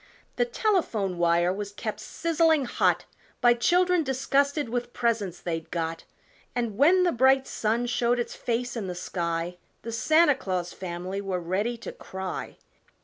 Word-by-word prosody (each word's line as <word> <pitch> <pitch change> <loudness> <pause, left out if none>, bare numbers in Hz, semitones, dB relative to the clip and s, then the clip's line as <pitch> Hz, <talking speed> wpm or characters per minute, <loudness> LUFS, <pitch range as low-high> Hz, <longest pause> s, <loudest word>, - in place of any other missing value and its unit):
The 485 - +3
telephone 320 - 0
wire 175 +1 +3
was 200 0 -5
kept 215 +1 -5
sizzling 325 -3 +1
hot - - +1 0.3
By 240 0 +6
children 355 +8 +3
disgusted 280 +2 +1
with 240 +1 -3
presents 225 -7 -1
they'd 165 -2 -4
got, 165 -1 -3 0.5
And 235 -4 -1
when 340 - +5
the 355 - +3
bright 265 +1 +4
sun 230 +3 -1
showed 240 +1 +1
its 240 - -2
face 240 +1 -2
in 215 -5 -3
the 180 - -4
sky 170 0 -3 0.3
The 230 - -5
Santa 310 +7 +4
Claus 185 -8 -3
family 185 +2 -5
were 190 -2 -2
ready 195 +8 -1
to 230 - -7
cry! 190 -1 -6
230 Hz, 150 wpm, -27 LUFS, 185-270 Hz, 0.5 s, By